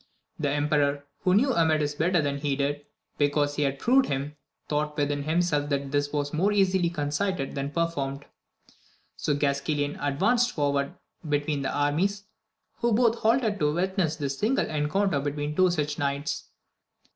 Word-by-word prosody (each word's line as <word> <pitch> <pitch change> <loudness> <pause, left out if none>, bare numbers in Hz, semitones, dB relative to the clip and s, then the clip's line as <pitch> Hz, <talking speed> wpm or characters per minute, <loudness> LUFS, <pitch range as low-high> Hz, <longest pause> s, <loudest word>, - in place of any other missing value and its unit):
The 145 -2 0
emperor, 145 0 +1
who 185 0 +2
knew 260 +5 +3
Amadis 155 -5 +2
better 160 +2 +1
than 140 0 -1
he 140 -1 0
did, 145 +1 -2 0.3
because 145 0 +1
he 150 - -1
had 140 -1 0
proved 260 - +3
him, 140 +2 -3 0.3
thought 150 0 -1
within 145 -1 0
himself 155 -1 0
that 140 -1 -1
this 145 0 0
was 145 0 -2
more 185 +7 +2
easily 190 -3 +2
conceited 150 0 -2
than 140 0 -3
performed. 145 -4 -2 0.9
So 150 - -1
Gasquailan 145 +1 -1
advanced 235 - +2
forward 140 -2 0 0.3
between 145 0 0
the 135 - -1
armies, 175 +8 0 0.5
who 235 - +1
both 230 0 +3
halted 225 -2 +2
to 150 -1 +1
witness 185 -3 0
this 140 -3 -3
signal 250 +6 +2
encounter 155 +3 +1
between 145 +1 -3
two 185 +1 +4
such 150 -3 -1
knights. 140 0 -2
150 Hz, 155 wpm, -27 LUFS, 145-180 Hz, 0.9 s, two